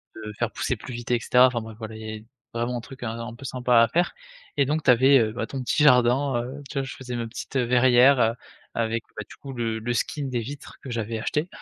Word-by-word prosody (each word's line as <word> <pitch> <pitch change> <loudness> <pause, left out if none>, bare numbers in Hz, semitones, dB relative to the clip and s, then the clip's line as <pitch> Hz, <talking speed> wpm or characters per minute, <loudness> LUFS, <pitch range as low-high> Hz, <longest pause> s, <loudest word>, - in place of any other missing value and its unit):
de 105 -1 -7
faire - - +1
pousser - - -2
plus 130 - -9
vite 120 0 -6
et 120 - +3
cetera. 125 +3 +5
Enfin 120 -2 -2
bref 110 -1 -9
voilà, 110 -1 -7
il 110 - -9
y 110 - -6
avait 110 0 -7 0.3
vraiment 120 +1 -2
un - - -3
truc 130 +1 -11
un 115 0 -4
un 115 0 -6
peu 135 - -13
sympa 125 -2 +3
à 115 - +4
faire 175 +2 +1 0.4
et 140 -2 +3
donc, 155 +3 0
tu - - +2
avais, 130 +2 +6
heu, 110 -1 0
bah, 115 - -3
ton 135 +2 -5
petit 145 +4 +1
jardin, 125 -1 +4
heu, 135 +4 -7
tu - - -9
vois, - - -1
je 135 - -7
faisais 125 -2 -6
ma 115 -1 -3
petite, 125 +3 -5
heu, 125 - +2
verrière, 125 +2 +5
heu, 115 +1 +3 0.4
avec, 115 0 -1
bah 105 - -3
du - - -12
coup 140 - -9
le 115 -3 -2
le 120 +2 -2
skin 145 +4 -2
des 125 -2 -2
vitres 140 +5 -8
que 135 - -9
j'avais 115 -1 -3
acheté, 150 +9 -1
120 Hz, 275 wpm, -25 LUFS, 115-130 Hz, 0.4 s, avais